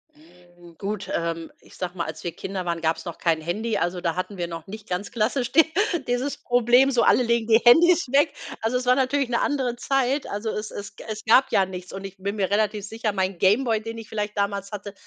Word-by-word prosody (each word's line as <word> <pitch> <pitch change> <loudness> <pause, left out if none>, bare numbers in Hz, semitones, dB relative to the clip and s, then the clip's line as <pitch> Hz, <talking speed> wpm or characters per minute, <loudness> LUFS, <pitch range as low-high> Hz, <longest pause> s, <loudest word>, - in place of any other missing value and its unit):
Hm, 175 - -19
gut, 205 +1 -4
ähm, 165 -1 -3
ich - - -18
sage 180 -1 -4
mal, 170 - -2
als - - -7
wir 175 - -3
Kinder 190 -2 -5
waren, 170 -1 -2
gab's 160 +3 -1
noch 170 - -7
kein 165 -2 +1
Handy. 215 +7 -2
Also 175 0 -1
da 165 -2 -1
hatten 185 +2 -4
wir 175 -1 -2
noch 165 -1 -7
nicht 215 +1 -10
ganz 185 +3 -3
klassisch 245 +2 0
di 325 - +7 0.4
dieses 250 +4 -1
Problem, 245 +2 +4
so 250 -3 +2
alle - - +5
legen 235 -1 +1
die 225 0 +6
Handys 335 +6 +6
weg. 290 +2 +3 0.3
Also 230 +3 0
es 250 - -4
war 250 - +6
natürlich 270 0 +1
'ne 235 - +1
andere 260 -4 0
Zeit. 270 +2 0
Also 205 +2 -3
es 210 0 -4
es 200 0 -8
g - - -11
es 215 0 -5
gab 255 +4 +5
ja 195 - +4
nichts 180 -1 -8
und 195 0 -6
ich 195 0 -9
bin 200 +2 -3
mir 190 -2 0
relativ 210 0 0
sicher, 225 -1 -2
mein 190 -1 -1
Game 205 +9 +3
Boy, 225 -3 0
den 225 +1 -6
ich 220 - -11
vielleicht 210 -1 -3
damals 200 0 -1
hatte, 205 0 -7
210 Hz, 240 wpm, -24 LUFS, 185-245 Hz, 0.4 s, di